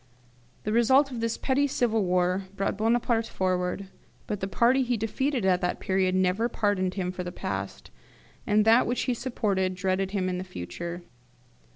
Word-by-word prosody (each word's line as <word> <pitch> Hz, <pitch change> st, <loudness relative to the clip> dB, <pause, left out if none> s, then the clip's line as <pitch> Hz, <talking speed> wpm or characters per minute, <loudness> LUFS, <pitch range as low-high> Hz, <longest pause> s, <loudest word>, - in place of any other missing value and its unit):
The 215 Hz, -, -2 dB
result 260 Hz, +5 st, +4 dB
of 245 Hz, -, -5 dB
this 230 Hz, 0 st, -1 dB
petty 280 Hz, +1 st, +1 dB
civil 230 Hz, -5 st, +1 dB
war 180 Hz, +1 st, +1 dB
brought 195 Hz, -, -1 dB
Bonaparte 225 Hz, +1 st, +1 dB
forward; 185 Hz, +1 st, -1 dB, 0.4 s
but 210 Hz, -2 st, -3 dB
the 190 Hz, -, -2 dB
party 235 Hz, +7 st, +3 dB
he 245 Hz, -2 st, 0 dB
defeated 245 Hz, +2 st, -1 dB
at 185 Hz, -1 st, +3 dB
that 180 Hz, -1 st, -1 dB
period 190 Hz, -1 st, +1 dB
never 185 Hz, +5 st, +1 dB
pardoned 200 Hz, -5 st, 0 dB
him 180 Hz, -2 st, -2 dB
for 180 Hz, 0 st, -5 dB
the 175 Hz, -, -5 dB
past, -, -, -5 dB, 0.6 s
and 210 Hz, 0 st, +3 dB
that 225 Hz, +3 st, +5 dB
which 245 Hz, +2 st, 0 dB
he 255 Hz, -, 0 dB
supported 200 Hz, -7 st, -1 dB
dreaded 190 Hz, +1 st, 0 dB
him 190 Hz, -2 st, -1 dB
in 180 Hz, 0 st, -2 dB
the -, -, -4 dB
future. 170 Hz, -, -6 dB
200 Hz, 175 wpm, -27 LUFS, 185-235 Hz, 0.6 s, that